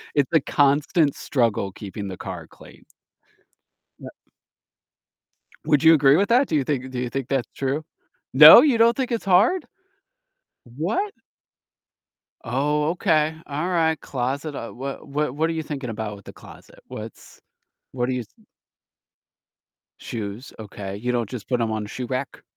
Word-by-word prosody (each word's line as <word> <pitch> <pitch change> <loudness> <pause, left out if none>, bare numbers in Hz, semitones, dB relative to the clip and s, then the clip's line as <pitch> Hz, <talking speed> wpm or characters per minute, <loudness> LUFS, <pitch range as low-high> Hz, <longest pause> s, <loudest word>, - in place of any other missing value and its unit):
It's 140 -2 +2
a 160 - +6
constant 145 +3 +2
struggle 115 -7 -1
keeping 100 0 -7
the 95 - -7
car 90 -4 -7
clean. - - -17 1.2
Yep. - - -10 1.5
Would 150 +1 +2
you 160 0 +8
agree 140 -2 +5
with 200 +3 +1
that? 255 +3 +4
Do 155 - 0
you 140 - +1
think 130 -2 -3
do 130 - -6
you 125 0 -2
think 135 -1 -4
that's 135 -4 -1
true? 140 +3 -2 0.5
No, - - +11
you 270 -7 +3
don't 230 +1 +4
think 260 -2 -2
it's 230 - -2
hard? 200 - +3 1.1
What? 370 - -1 1.3
Oh, 150 +5 0
okay, 160 -3 +1
alright, 160 +1 0
closet. 140 +4 -4
Uh, 115 - -7
wha 135 +2 -6
wha 150 +1 -2
what 155 +5 -1
are - - -1
you 160 -1 -3
thinking 140 -5 -6
about 105 -1 -5
with 100 - -16
the - - -11
closet? - - -16
What's - - -10 0.5
what 125 -1 -2
are 130 - 0
you 125 -2 -3
th 105 - -29 1.5
Shoes, 110 +2 -7
okay, 100 -2 -7
you 125 +4 -2
don't 120 -3 -1
just 120 -3 -8
put 125 -2 -1
'em 115 -1 0
on 110 -1 -3
shoe 125 +4 -6
rack? 130 +1 -5
135 Hz, 155 wpm, -23 LUFS, 120-160 Hz, 1.5 s, No